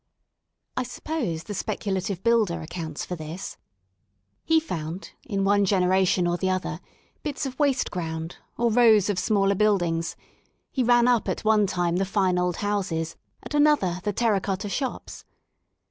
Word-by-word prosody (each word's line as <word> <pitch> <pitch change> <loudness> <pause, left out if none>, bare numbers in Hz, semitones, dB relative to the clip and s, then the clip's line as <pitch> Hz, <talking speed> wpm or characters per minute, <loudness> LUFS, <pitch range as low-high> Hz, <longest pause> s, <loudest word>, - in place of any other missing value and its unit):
I - - 0
suppose 250 - -3
the 210 - -6
speculative 190 -1 -3
builder 220 -8 +2
accounts 160 -2 -5
for 180 - -4
this. 160 +3 -7 0.9
He 320 0 +4
found 170 - -5 0.2
in 200 -4 -1
one 205 +1 +3
generation 185 -1 +3
or 175 0 +1
the 190 - -1
other^ 185 0 -1 0.4
bits 295 -1 -3
of 260 +1 -6
waste 280 -3 +2
ground, 165 -1 -4 0.2
or 235 -1 +2
rows 220 -4 +5
of 185 - -2
smaller 200 0 +2
buildings; 175 -5 +1 0.6
he 265 - 0
ran 240 0 +4
up 245 -3 +2
at - - -3
one 215 -2 +4
time 175 -2 0
the 195 - +1
fine 190 -2 +1
old 180 -1 0
houses, 185 -6 -1 0.3
at - - -8
another 290 - +3
the 210 - 0
terra 210 -2 +1
cotta 195 +1 -3
shops. 260 +5 -4
195 Hz, 155 wpm, -25 LUFS, 180-230 Hz, 0.9 s, rows